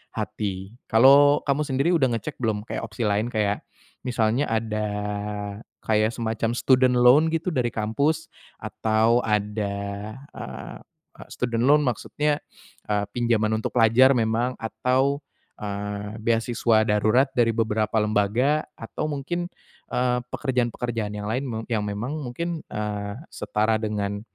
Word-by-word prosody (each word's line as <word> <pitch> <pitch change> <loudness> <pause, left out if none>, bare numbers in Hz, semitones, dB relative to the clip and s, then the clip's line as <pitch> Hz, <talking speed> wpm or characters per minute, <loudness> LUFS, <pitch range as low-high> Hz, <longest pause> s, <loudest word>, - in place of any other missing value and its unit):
hati. 95 +1 -4
Kalo 140 +5 +6
kamu 140 +1 +1
sendiri, 135 +4 +1
udah 135 -6 +3
ngecek 145 +5 -5
belum 110 -3 0
kayak - - -3
opsi 115 +2 -5
lain? 105 +2 +1
Kayak 105 -2 0 0.4
misalnya 120 +2 +1
ada 110 -1 -1 1.0
kayak 110 +1 +2
semacam 115 -1 -1
student 130 0 +4
loan 125 +6 +6
gitu 165 +2 0
dari 125 -4 +1
kampus? 145 +10 0 0.3
Atau 110 +2 +2
ada, 105 -1 -1 0.6
eee, - - -8 0.5
student 120 -1 -1
loan 150 +1 +6
maksudnya, 145 +4 0 0.5
eee, 105 -1 +1
pinjaman 115 -2 +1
untuk - - -3
pelajar 120 +3 +6
memang 115 +2 +1
atau, 125 +5 +1 0.4
eee, 105 0 -4
beasiswa 115 -1 +2
darurat 110 +5 +3
dari 120 -2 +3
beberapa 110 -1 0
lembaga? 110 +8 +2 0.2
Atau 155 - -4
mungkin, 175 +5 -3 0.4
eee, 125 0 +1
pekerjaan-pekerjaan 120 -4 -1
yang 105 0 -5
lain, 125 +5 -1
me 115 - -3
yang 110 -2 +1
memang 105 +8 -3
mungkin, 165 +6 -4
eee, 105 -1 -3 0.2
setara 110 +1 0
dengan, 100 -2 -2
115 Hz, 125 wpm, -24 LUFS, 105-130 Hz, 1.0 s, Kalo